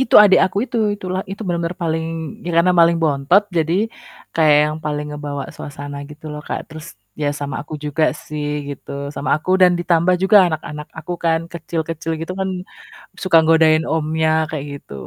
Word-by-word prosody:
Itu 265 - 0
adik 205 -2 +6
aku 195 +2 -1
itu - - -4 0.2
itulah 185 -2 -3
itu 195 - -7
bener-bener 170 -1 -1
paling 160 -1 -1 0.4
ya 175 - -3
karena 175 +2 +5
paling 170 0 +5
bontot, 150 +5 +3
jadi 160 0 +1 0.6
kayak 155 -2 +5
yang 155 - -4
paling 150 -1 -2
ngebawa 145 -1 -5
suasana 145 0 -7
gitu 150 +1 -14
loh 150 - -6
Kak, - - -2
terus 155 0 -9 0.4
ya 145 - +2
sama 140 -2 -3
aku 155 - -8
juga 150 +2 +1 0.2
sih 150 -1 -4 0.2
gitu, 140 -2 -8 0.2
sama 140 - -3
aku 185 - -4
dan 180 -1 +7
ditambah 175 +1 +3
juga 195 +2 +5 0.2
anak-anak 150 -1 -5
aku 160 +2 -5
kan 165 -1 +3
kecil-kecil 165 -1 -4
gitu 165 +3 -4
kan 190 - 0 0.7
suka 185 -3 +5
godain 160 -1 +5
omnya 160 0 +1 0.2
kayak 145 -3 -3
gitu. 140 - -14
160 Hz, 175 wpm, -19 LUFS, 150-170 Hz, 0.7 s, dan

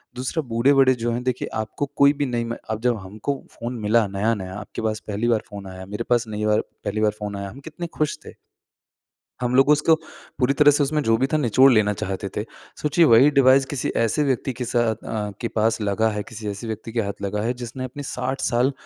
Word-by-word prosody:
दूसरा 130 +6 -2
बूढ़े-बड़े 130 +3 +4
जो 120 0 -2
हैं 125 +1 -3
देखिए 125 -1 -2
आपको 110 +6 -2
कोई 140 +1 +6
भी 145 0 -1
नई 120 -3 -1
मैं 115 0 -4
अब 110 - -3
जब 120 -2 +1
हमको 105 +9 -4 0.2
फ़ोन 120 +1 -6
मिला 110 +1 +3
नया-नया, 100 -1 -2
आपके 105 - -7
पास 110 -1 -1
पहली 105 +3 -1
बार 115 -2 +3
फ़ोन 100 -2 -8
आया, 95 0 -9
मेरे 105 +3 -4
पास 120 -1 +3
नई 105 0 -3
बार 105 0 +3 0.2
पहली 105 +1 -1
बार 105 -1 +3
फ़ोन 105 -1 -4
आया। 100 0 -5
हम 130 - -11
कितने 170 +2 -6
खुश 155 -1 0
थे? - - -10 1.1
हम 125 +1 0
लोग 135 +2 +5
उसको 150 +2 +5 0.4
पूरी 130 +2 +3
तरह 145 0 +8
से 145 0 +2
उसमें 150 +2 0
जो 115 - +3
भी 135 - +1
था - - +4
निचोड़ 130 0 +5
लेना 105 -3 +3
चाहते 95 0 -4
थे। 105 - -1 0.4
सोचिए 150 +3 +4
वही 125 +3 +7
डिवाइस 135 -1 +5
किसी 135 -1 -3
ऐसे 130 +7 +1
व्यक्ति 130 -1 -1
के 125 +1 -4
साथ 120 -2 +1
अ, 105 -2 -4
के 115 - -1
पास 110 +1 0
लगा 105 +2 +1
है, 105 -1 -3
किसी 110 -1 -8
ऐसे 105 +3 -6
व्यक्ति 110 +1 -5
के 115 - 0
हाथ 100 -1 -5
लगा 100 +1 -2
है 120 +3 0
जिसने 130 +2 -6
अपने 135 +3 -6
60 130 0 -3
साल 125 +3 +2
115 Hz, 230 wpm, -23 LUFS, 105-135 Hz, 1.1 s, तरह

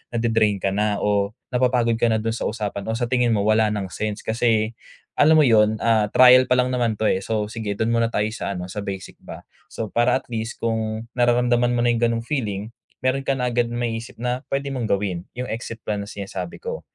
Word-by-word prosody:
na-de-drain 110 -4 +1
ka 95 - +1
na 105 +1 0
o 100 0 +1 0.2
napapagod 125 -2 +2
ka 120 - +3
na 110 - +2
do'n 115 - 0
sa 115 - -2
usapan 105 -2 -4
o 110 - -1
sa 120 - -2
tingin 120 -3 +2
mo 100 - 0
wala 110 +1 +3
ng 100 -3 -3
sense 105 +1 -4
kasi, 110 -1 +1 0.5
alam 155 +2 +6
mo 155 - +6
yun, 110 -4 +4
ah, 110 -2 +3
trial 125 +3 +7
pa 125 - +3
lang 125 0 +2
naman 120 -3 0
'to, 110 - -4
eh. 100 -3 +2
So 105 +1 -2
sige, 110 -3 -4
do'n 110 +3 0
muna 115 0 +2
tayo 105 -2 0
sa 100 -2 -4
ano, 90 0 -6
sa 105 - -5
basic 100 -2 -6
ba. - - -10 0.2
So, 110 -2 -6
para 120 +1 +3
at 135 - -3
least 115 +1 -3
kung 110 -1 -1 0.2
nararamdaman 120 0 +3
mo 120 - +1
na 120 - +3
'yung 120 - 0
gano'ng 115 -1 +1
feeling, 110 -6 -3 0.3
meron 130 +1 0
ka 135 - +2
na 125 -1 -1
agad 120 0 +1
maisip 115 -1 -4
na 125 +1 -2
pwede 140 0 -2
mong 125 -4 -2
gawin, 95 -3 -1
'yung 125 +1 -4
exit 115 0 -6
plan 105 -1 -2
na 100 - -7
sinasabi 95 -3 -7
ko. - - -4
115 Hz, 225 wpm, -22 LUFS, 105-120 Hz, 0.5 s, trial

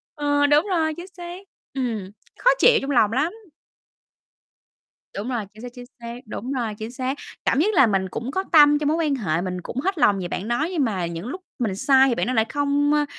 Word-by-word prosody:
Ờ, 290 -1 +1
đúng 295 +3 +4
rồi, 320 -4 +1
chính 350 - -8
xác. 350 +1 -7 0.3
Ừm, 225 -8 -3 0.3
khó - - +4
chịu 480 -1 +6
trong 275 - -3
lòng 220 -5 +3
lắm. 285 - 0 1.8
Đúng 210 +5 -4
rồi, 235 -5 -2
chính 215 - -14
xác, 245 - -7
chính 245 -1 -10
xác. 235 0 -7
Đúng 240 +4 -6
rồi, 235 -5 -2
chính 220 +2 -6
xác, 260 +2 -3 0.3
cảm - - +2
giác 420 +7 +2
là 270 - +6
mình 190 -3 0
cũng 235 +7 -5
có 380 +6 -1
tâm 295 -2 +7
trong 295 - -1
mối 315 - +1
quan 305 -4 +1
hệ, 175 -9 -1
mình 180 -1 -4
cũng 245 - -5
hết 385 +6 -1
lòng 205 -9 +3
về 180 - -3
bạn 185 +3 -4
đó 240 +7 0
nhưng 330 -6 0
mà 195 -8 -1
những 170 +4 -6
lúc 365 +9 -6 0.2
mình 220 -6 -1
sai 265 +5 +4
thì 240 - 0
bạn - - -1
đó 255 - 0
lại 220 -2 +3
không, 290 +2 +1
ơ, 295 0 +2
260 Hz, 230 wpm, -23 LUFS, 220-295 Hz, 1.8 s, tâm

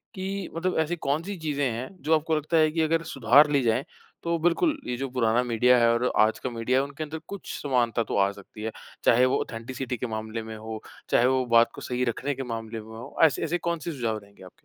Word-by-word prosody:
कि, 190 0 -4
मतलब 180 +2 -1
ऐसी 160 +2 0
कौन-सी 165 +6 -2
चीज़ें 145 -4 -1
हैं 120 +3 -4 0.2
जो 160 - +2
आपको 160 +1 0
लगता 155 +2 0
है 155 -1 +4
कि 165 +1 0
अगर 165 +1 +1
सुधार 135 +4 +6
ली 140 -2 +3
जाएँ 115 +2 +2 0.4
तो 170 0 0
बिल्कुल, 175 - +2
ये 125 - -2
जो 135 +2 -2
पुराना 120 -1 +2
मीडिया 125 +1 +4
है 115 - +5
और 120 +2 +1
आज 110 +1 +4
का 130 - -3
मीडिया 125 +3 +1
उनके 140 +2 -6
अंदर 155 +1 -6
कुछ 200 -1 -7
समानता 120 -4 +1
तो 105 - -3
आ 100 0 +3
सकती 100 +2 -11
है। 110 - -2 0.3
चाहे 125 +2 +5
वो 130 - +2
ऑथेंटिसिटी 125 +2 -5
के 125 - -3
मामले 110 0 -4
में 110 0 -7
हो, 110 0 -7 0.3
चाहे 120 - +4
वो 130 0 +2
बात 115 0 +6
को - - -9
सही 125 0 -2
रखने 130 +4 -1
के 135 - -4
मामले 115 0 -5
में 110 - -14
हो, 115 - -10
ऐसे 160 -4 +4
ऐसे 165 +2 0
कौन-से 170 -1 -3
सुझाव 115 -7 -2
रहेंगे 100 -2 -15
आपके? 95 - -11
130 Hz, 235 wpm, -26 LUFS, 115-155 Hz, 0.4 s, सुधार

